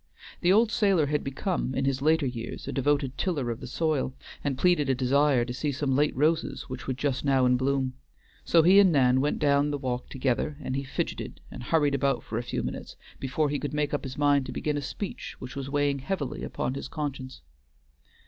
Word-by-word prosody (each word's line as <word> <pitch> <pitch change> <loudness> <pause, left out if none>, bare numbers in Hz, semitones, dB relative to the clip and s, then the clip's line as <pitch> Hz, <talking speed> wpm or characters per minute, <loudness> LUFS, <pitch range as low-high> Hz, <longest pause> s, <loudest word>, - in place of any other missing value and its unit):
The 175 - +3
old 220 +3 +4
sailor 195 -7 +3
had 150 +1 -1
become 135 0 -2
in 135 - 0
his 135 -1 0
later 155 0 +3
years 120 -3 -5
a - - -2
devoted 140 -1 0
tiller 145 -10 -1
of 115 - -5
the 125 - -7
soil, 140 -2 -1 0.3
and 140 -3 -1
pleaded 160 -3 +3
a 135 - +3
desire 135 0 +3
to 125 - -5
see 145 +3 -1
some 135 -1 -1
late 145 +2 +2
roses 155 +4 +1
which 130 0 -8
were 130 - -1
just 135 0 -1
now 135 -2 +3
in 125 0 +4
bloom. 130 0 0 0.5
So 165 -1 +4
he 190 +4 +7
and 195 -3 +6
Nan 130 -3 +4
went 145 - 0
down 145 -1 +3
the 145 - -1
walk 125 -3 -3
together, 135 +2 -1
and 130 - -3
he 140 - -2
fidgeted 135 - -4
and - - -8
hurried 145 +2 +2
about 140 0 +1
for 115 - -3
a - - -1
few - - -3
minutes - - -6 0.2
before 140 +2 0
he 145 - -1
could 145 0 -4
make 150 -1 0
up 145 - -1
his 130 -2 -6
mind 145 -2 +3
to - - -5
begin 150 -1 -2
a 145 - -1
speech 185 +8 -6
which 130 0 -9
was 135 -1 -4
weighing 145 -1 +1
heavily 145 -1 -3
on 130 - 0
his 140 - -5
conscience. 130 - -5
140 Hz, 220 wpm, -27 LUFS, 130-150 Hz, 0.5 s, he